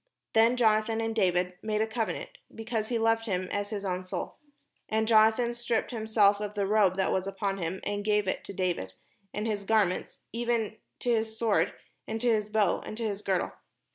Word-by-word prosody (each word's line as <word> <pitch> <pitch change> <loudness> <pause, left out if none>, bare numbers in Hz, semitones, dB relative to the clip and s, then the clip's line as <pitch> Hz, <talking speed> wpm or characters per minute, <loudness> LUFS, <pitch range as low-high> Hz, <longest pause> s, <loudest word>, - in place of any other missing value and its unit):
Then 230 +3 +5
Jonathan 220 -1 +3
and 225 0 -1
David 180 -3 +1
made 215 -1 -1
a 220 - +3
covenant, 225 0 -3 0.2
because 225 -1 -2
he 240 - 0
loved 225 0 +2
him 185 -2 -1
as 205 0 -2
his 205 -2 -4
own 185 -1 -2
soul. 185 - -5 0.5
And 220 0 +1
Jonathan 225 +2 +4
stripped 240 -1 -1
himself 215 -3 +3
of 210 0 -4
the 200 -1 0
robe 200 -2 +3
that 190 - +1
was 190 0 0
upon 195 0 -2
him, 175 +2 -3
and 205 0 -2
gave 210 -1 +2
it - - -1
to - - -6
David, 175 - -1 0.4
and 210 +1 -3
his 210 -3 -1
garments, 200 -3 +1
even 230 -2 -1 0.2
to 245 - +1
his 220 -1 0
sword, 205 -6 +2 0.3
and 220 +1 -3
to 245 - +2
his 215 -1 0
bow, 210 -1 +2
and 215 - -7
to 230 - -3
his 205 -2 -2
girdle. 190 -3 0
215 Hz, 200 wpm, -29 LUFS, 195-225 Hz, 0.5 s, Then